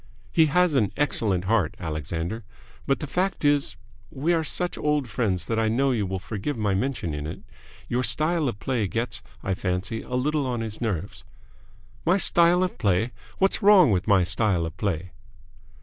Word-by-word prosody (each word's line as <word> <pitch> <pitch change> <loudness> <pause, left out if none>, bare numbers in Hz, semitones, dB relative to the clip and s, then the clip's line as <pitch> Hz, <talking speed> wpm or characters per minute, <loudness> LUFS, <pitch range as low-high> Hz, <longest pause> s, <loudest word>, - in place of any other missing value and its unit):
"He 160 -2 +4
has 180 +2 +3
an 110 -8 +2
excellent 105 -10 +1
heart, 100 -5 +1
Alexander. 80 +6 -4 0.4
But 135 - +1
the - - -2
fact 180 +2 -1
is 145 -1 +2 0.3
we 150 +6 0
are 165 -1 +1
such 175 +3 -1
old 150 -3 0
friends 100 -5 -1
that 115 +2 -1
I 110 - +2
know 135 +5 +2
you 110 -6 0
will 95 +1 -3
forgive 110 +8 -4
my 105 -3 0
mentioning 85 - -2
it 80 - -7 0.5
your 125 +1 0
style 155 +3 +1
of 105 - -7
play 120 -6 -1
gets, 115 +6 -3 0.2
I 95 - -1
fancy, 95 +4 -2
a 125 - -5
little 145 +2 0
on 120 -2 -2
his 110 0 -4
nerves." 100 -5 -3 0.8
"My 180 +3 +3
style 175 -1 +4
of 185 - -3
play? 105 +2 +1 0.3
What's 195 0 +2
wrong 195 - +7
with 90 -2 0
my 100 -3 +5
style 90 -1 +1
of 80 - -6
play?" 90 -6 -3
115 Hz, 180 wpm, -25 LUFS, 95-145 Hz, 0.8 s, wrong